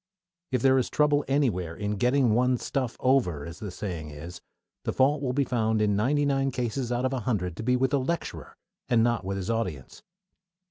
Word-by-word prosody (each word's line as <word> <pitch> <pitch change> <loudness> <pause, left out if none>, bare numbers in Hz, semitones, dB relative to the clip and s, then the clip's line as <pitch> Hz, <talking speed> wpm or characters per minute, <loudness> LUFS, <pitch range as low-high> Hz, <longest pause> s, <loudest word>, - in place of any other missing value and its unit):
If 125 -2 0
there 130 0 +5
is 125 - -1
trouble 150 -1 +2
anywhere 110 - 0
in 105 +2 -3
"getting 125 +1 +3
one's 125 +1 +2
stuff 130 -4 -2
over," 115 - +2
as 85 0 -9
the 105 - -5
saying 90 -4 -5
is, 80 +4 -9 0.4
the - - -1
fault 140 +2 +2
will 130 -3 0
be 140 +2 +1
found 110 -4 0
in 105 -1 +2
ninety 140 +8 +2
nine 135 -1 +1
cases 125 0 -2
out 120 +1 0
of 130 - 0
a 130 - -1
hundred 100 -7 -2
to - - -4
be 125 +3 +2
with 130 +1 +1
the 140 - +2
lecturer, 170 +6 -4 0.3
and 115 -2 +4
not 120 -3 +1
with 95 +1 -3
his 95 +3 -2
audience. 90 - -4
120 Hz, 205 wpm, -27 LUFS, 100-135 Hz, 0.4 s, there